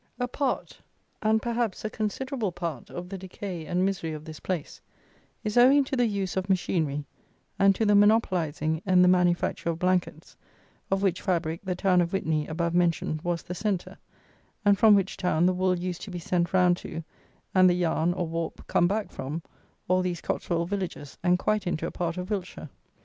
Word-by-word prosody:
A 245 - 0
part, 265 +1 -3 0.4
and, 220 0 +2
perhaps, 235 -3 -1
a - - 0
considerable 225 +1 -2
part, 170 -7 -5
of 175 0 -6
the 195 +1 -6
decay 185 -3 -6
and 180 +1 +1
misery 180 -5 -2
of 155 0 -8
this 155 -1 -9
place, 175 -5 -4 0.6
is 215 +3 +2
owing 270 +3 +7
to 270 - -3
the 245 -2 +3
use 200 -3 -2
of 190 +1 -2
machinery, 160 -6 0 0.5
and 195 0 +5
to 220 - 0
the 210 - +4
monopolizing, 175 -7 +2
in 185 -1 +5
the - - +5
manufacture 175 -1 +2
of 165 - -1
Blankets, 180 +1 -1 0.5
of 195 0 0
which 185 -2 +1
fabric 165 -2 -1
the 185 -2 -2
town 180 -1 +3
of 170 +1 -2
Witney 155 -5 0
(above 170 +1 -1
mentioned) 170 -3 +1
was 175 0 -2
the 180 - -6
centre, 200 -1 -2 0.7
and 200 0 +6
from 215 -2 +7
which 195 -1 0
town 175 -2 +1
the 185 - +4
wool 185 0 +1
used 180 0 -4
to - - -7
be 180 - -5
sent 175 0 0
round 180 -1 +4
to, 165 -1 -7 0.5
and 185 -1 +6
the 175 - +3
yarn, 170 -1 +1
or 180 -1 -2
warp, 165 0 -4
come 175 - +3
back 210 +3 -2
from, 150 +5 -5 0.4
all 185 +1 +3
these 180 -2 -2
Cotswold 170 -1 -2
villages, 185 -7 -5
and 180 0 +3
quite 215 +1 0
into 165 -2 -1
a - - -3
part 170 0 -3
of 180 +3 -5
Wiltshire. 180 -6 -4
180 Hz, 195 wpm, -27 LUFS, 170-195 Hz, 0.7 s, owing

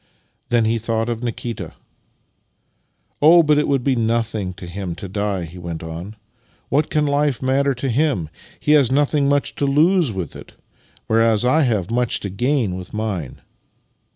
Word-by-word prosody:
Then 120 -2 +3
he 115 +1 +1
thought 115 +1 -1
of 115 -1 -3
Nikita 115 -6 -5 0.7
" - - -46
Oh, 165 +3 +7
but 150 -1 +3
it 150 - 0
would 135 -3 +1
be 135 -1 +2
nothing 115 -4 -1
to 90 - -9
him 90 0 -5
to 95 - -7
die," 100 -2 -2
he 85 +3 -11
went 85 -1 -6
on. 85 +6 -7 0.3
" 115 - -38
What 145 +3 +1
can 150 -1 +1
his 145 - 0
life 145 -3 +1
matter 135 +1 +1
to 130 +3 -3
him? 130 - +1 0.3
He 150 - 0
has 145 -5 +5
nothing 145 0 +2
much 145 0 +1
to 140 - 0
lose 160 +1 +3
with 95 -6 -5
it, - - -12 0.5
whereas 115 -1 +2
1 140 +5 +3
have 110 -5 -1
much 120 0 +1
to 100 - -4
gain 120 -2 0
with 90 +2 -9
mine." 100 - -4
115 Hz, 180 wpm, -20 LUFS, 100-140 Hz, 0.7 s, Oh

